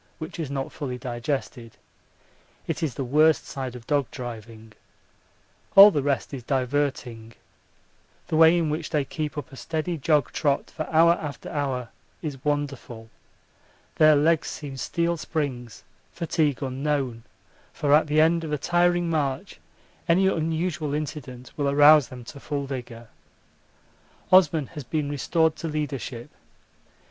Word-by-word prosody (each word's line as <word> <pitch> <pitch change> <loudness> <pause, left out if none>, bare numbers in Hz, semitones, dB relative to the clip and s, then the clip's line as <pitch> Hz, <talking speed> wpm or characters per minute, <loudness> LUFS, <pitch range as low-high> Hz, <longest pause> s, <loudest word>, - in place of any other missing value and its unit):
which 160 +1 -8
is 155 -5 -3
not 135 -1 -4
fully 130 -5 -5
digested. 120 -1 -4 0.9
It 165 0 -3
is 155 -6 -2
the 135 - -3
worst 155 +5 +3
side 130 -2 -6
of 120 -2 -10
dog 140 -2 0
driving. 115 -3 -9 1.0
All 200 +1 +11
the 145 - 0
rest 140 0 -1
is 135 - -5
diverting. 130 -3 -2 0.9
The - - -2
way 160 +2 +6
in 160 -3 0
which 155 - -3
they 150 -3 0
keep 150 +1 -5
up 145 - -6
a - - -11
steady 160 +4 -3
jog 150 0 +2
trot 140 -3 -1
for 155 - -5
hour 165 +1 +5
after 150 -4 -4
hour 130 -5 -2 0.3
is 140 -4 -5
wonderful. 140 -6 -3 0.9
Their 155 -1 +6
legs 155 +2 +2
seem 145 -3 -6
steel 170 +5 -1
springs, 135 -8 -4 0.3
fatigue 155 -4 -1
unknown 135 -2 -2 0.5
for 145 -1 0
at 155 +1 +5
the 150 +1 +3
end 165 +1 +3
of 155 - -5
a 150 - 0
tiring 175 +2 +2
march 145 -5 -2 0.5
any 180 +3 +4
unusual 160 -3 -1
incident 140 -5 -6
will 145 -2 0
arouse 145 -1 +6
them 125 -1 -10
to 140 +4 -11
full 140 -1 -4
vigour. 120 -4 -7 1.2
Osman 175 -5 +5
has 150 -3 -6
been 145 +3 -2
restored 160 +3 +1
to 165 - -5
leadership. 135 -6 -4
145 Hz, 145 wpm, -25 LUFS, 130-160 Hz, 1.2 s, All